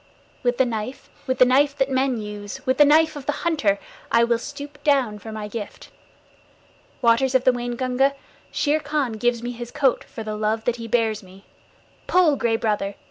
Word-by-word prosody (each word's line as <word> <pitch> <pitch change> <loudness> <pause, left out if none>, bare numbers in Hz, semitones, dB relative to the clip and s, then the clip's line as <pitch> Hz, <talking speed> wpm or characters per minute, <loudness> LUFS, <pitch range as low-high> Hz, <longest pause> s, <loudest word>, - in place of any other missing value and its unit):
With 245 -1 0
the 260 - +4
knife, 230 +2 -5 0.2
with 260 -1 0
the 255 - +7
knife 280 +3 +3
that 270 - +2
men 260 -1 +1
use, 210 +4 -7
with 260 +1 +1
the 295 - +9
knife 315 +2 +4
of 280 -2 -8
the - - +3
hunter, 290 -13 +2 0.3
I 230 - +5
will 235 0 +2
stoop 290 +2 -9
down 265 -8 +2
for 220 - -9
my 215 -1 -5
gift. 210 -1 -8 1.1
Waters 245 +3 +3
of 255 - +4
the 255 - +5
Waingunga, 250 +3 0 0.4
Shere 300 +1 +1
Khan 290 -4 -1
gives 235 +1 0
me 240 - -3
his 240 0 -7
coat 265 -1 +1
for 225 - -8
the 215 0 -4
love 215 +1 -1
that 245 -1 0
he 230 -1 -7
bears 225 -2 +1
me. 190 0 -16 0.6
Pull, 350 -5 +4
Gray 235 -3 +1
Brother! 210 -3 -1
245 Hz, 190 wpm, -23 LUFS, 220-275 Hz, 1.1 s, the